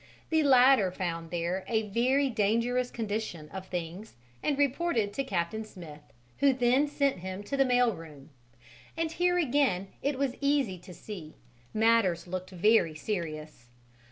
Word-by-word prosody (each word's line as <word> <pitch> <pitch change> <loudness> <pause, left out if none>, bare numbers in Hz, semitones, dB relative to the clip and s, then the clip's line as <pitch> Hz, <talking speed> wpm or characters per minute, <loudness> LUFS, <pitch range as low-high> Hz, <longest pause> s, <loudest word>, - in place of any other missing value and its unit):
The 320 0 +4
latter 260 -7 +6
found 170 -2 -4
there 175 +2 -2
a 220 -2 0
very 260 +6 +2
dangerous 235 +2 +1
condition 210 -8 -4
of 190 -1 -8
things 180 - -6 0.3
and 285 - 0
reported 275 -7 +1
to 275 - -1
Captain 195 -1 -2
Smith, 170 -8 -11 0.4
who 280 -1 +5
then 255 +3 +3
sent 280 -6 0
him 185 +2 -6
to 275 - -3
the 270 0 +3
mail 245 -2 +3
room; 155 -4 -12 0.7
and 325 -1 -1
here 355 +1 +1
again, 260 - +1
it 285 -1 -1
was 275 -2 0
easy 280 -10 +1
to 180 +1 -12
see, 175 -8 -9 0.4
matters 220 -6 +2
looked 185 +1 -5
very 185 -3 +3
serious. 155 - -5
215 Hz, 150 wpm, -29 LUFS, 180-265 Hz, 0.7 s, latter